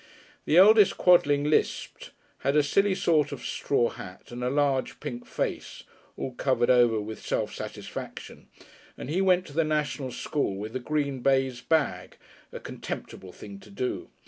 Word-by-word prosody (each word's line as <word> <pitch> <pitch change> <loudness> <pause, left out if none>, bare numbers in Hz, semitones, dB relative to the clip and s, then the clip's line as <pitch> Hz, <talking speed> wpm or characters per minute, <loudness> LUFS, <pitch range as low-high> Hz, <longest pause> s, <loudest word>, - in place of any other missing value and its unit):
The 155 - +3
eldest 210 +2 +7
Quodling 145 -5 +4
lisped, 150 +1 -1 0.3
had 140 +1 0
a 150 - +5
silly 195 +7 +2
sort 160 -6 +2
of - - -7
straw 120 -4 0
hat 90 +5 -11
and 120 +1 -6
a 125 - 0
large 140 -1 0
pink 120 0 -7
face - - -4 0.3
(all 130 - -4
covered 125 -1 +1
over 120 -3 +4
with 105 +1 -7
self - - -2
satisfaction), - - -8 0.5
and 140 - -6
he 180 +4 +1
went 185 -1 +3
to 145 - -12
the 165 +2 +2
National 150 -3 -2
School 140 -6 -2
with 110 +4 -7
a - - -1
green 140 0 -2
baize 135 -1 +1
bag 145 - -1 0.3
a - - -7
contemptible 95 -1 -7
thing 100 +1 -11
to 100 +2 -16
do. 115 +5 -4
140 Hz, 165 wpm, -27 LUFS, 120-155 Hz, 0.5 s, eldest